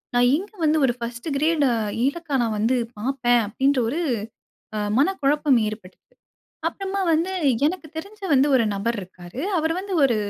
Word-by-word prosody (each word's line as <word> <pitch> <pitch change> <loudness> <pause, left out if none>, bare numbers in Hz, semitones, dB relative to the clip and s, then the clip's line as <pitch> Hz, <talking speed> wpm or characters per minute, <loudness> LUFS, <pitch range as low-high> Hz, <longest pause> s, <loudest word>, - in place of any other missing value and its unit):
நான் 245 0 +5
இங்க 390 +4 -7
வந்து 310 0 +3
ஒரு 245 - +1
ஃபர்ஸ்ட்டு 235 +5 -5
கிரேடு 305 -2 +2 0.4
ஏலக்கா 305 0 -2
நான் 225 -2 -1
வந்து 230 +5 +2 0.2
பாப்பேன்" 245 0 +2
அப்டின்ற 265 +4 +1
ஒரு 310 +8 -2 1.0
மனக்குழப்பம் 290 -4 +3
ஏற்பட்டுது. 210 -4 -9 0.7
அப்புறமா 390 0 -3
வந்து, 335 +4 +1 0.4
எனக்கு 335 0 -4
தெரிஞ்ச 400 +6 -8
வந்து 275 +1 +5
ஒரு 245 - +4
நபர் 220 +4 -1
இருக்காரு, 180 +3 -10 0.2
அவரு 320 +1 +1
வந்து 390 0 -5
ஒரு 255 -4 +4
275 Hz, 145 wpm, -23 LUFS, 235-320 Hz, 1.0 s, நான்